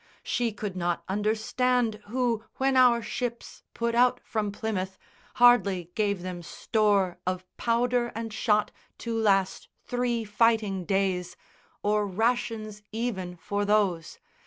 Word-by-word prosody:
She 240 -2 0
could 205 -2 -5
not 175 -1 -1
understand 220 +3 0
who, 235 -1 0
when 265 0 +1
our 245 -2 +5
ships 240 0 -5
Put 235 0 -1
out 245 +1 +4
from 210 -2 -2
Plymouth, 190 -3 -3 0.4
hardly 200 -8 +4
gave 200 -4 0
them 180 -1 -5
store 200 0 +1
Of 185 0 -2
powder 240 +1 +1
and 225 -1 -5
shot 210 -1 +1 0.3
to 230 -1 -4
last 195 -4 +1 0.2
three 245 -2 -1
fighting 210 -3 +1
days, 190 -2 0 0.5
Or 210 0 +1
rations 215 0 -1
even 210 -6 -3
for 205 +4 -2
those. 200 -5 +1
215 Hz, 125 wpm, -27 LUFS, 195-235 Hz, 0.5 s, our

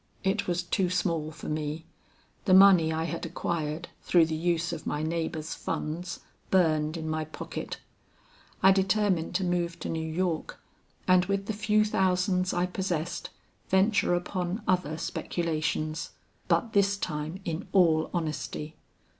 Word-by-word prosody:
It 195 +2 0
was 175 0 0
too 180 +1 0
small 170 -4 0
for 155 - -9
me. 155 +1 -3 0.6
The 185 -3 +6
money 190 -4 +7
I 160 0 -1
had 165 - -4
acquired 165 -1 -3
through 170 -2 +4
the 160 0 -2
use 170 +1 0
of - - -6
my 150 +1 -1
neighbor's 160 -1 -2
funds 170 +4 -4 0.3
burned 155 -3 +2
in 160 -1 -4
my 155 0 -1
pocket. 155 - -6 0.8
I 190 - +8
determined 190 -3 +1
to 190 - +1
move 175 -1 0
to - - -4
New 160 - -2
York, 170 -1 -2 0.5
and 185 0 +5
with 195 +1 -1
the 220 - -2
few 215 0 +2
thousands 185 -2 +1
I 175 0 +1
possessed, 180 -3 -3 0.4
venture 190 -1 +3
upon 180 +3 -2
other 180 -4 +1
speculations. 155 -2 -2 0.4
But 230 - +1
this 200 0 +3
time 155 0 -4
in 165 -1 -3
all 165 -5 +4
honesty. 155 -2 -4
175 Hz, 145 wpm, -28 LUFS, 160-185 Hz, 0.8 s, I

